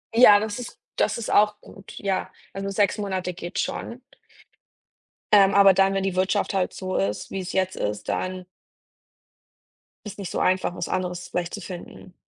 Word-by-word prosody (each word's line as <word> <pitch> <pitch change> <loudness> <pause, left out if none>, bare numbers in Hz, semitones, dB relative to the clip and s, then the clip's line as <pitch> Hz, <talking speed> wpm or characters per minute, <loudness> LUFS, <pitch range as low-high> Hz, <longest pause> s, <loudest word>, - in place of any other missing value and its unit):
Ja, 220 -4 +8
das 215 +1 -4
ist 245 - -8 0.2
das - - +1
ist 235 - -4
auch 210 0 +4
gut, 195 - -14
ja. 195 -2 -2 0.2
Also 195 0 -4
6 200 +1 +1
Monate 190 -3 -2
geht 175 +2 -7
schon. 235 +3 -3 1.3
Ähm, 200 -1 +6
aber 200 -1 +7
dann, 195 +1 +3
wenn 195 0 0
die 195 -2 -1
Wirtschaft 190 +3 +1
halt 190 -2 0
so 185 -1 -4
ist, 100 +2 -2
wie's 190 -1 -4
jetzt 185 0 0
ist, 105 0 -3
dann 185 0 -3 1.6
ist 210 - -8
nicht 195 - -5
so - - -2
einfach, 185 -1 +1
was - - -4
anderes 180 -1 -3
vielleicht 175 -1 -3
zu 205 - -5
finden. 180 0 -10
190 Hz, 170 wpm, -24 LUFS, 185-200 Hz, 1.6 s, Ja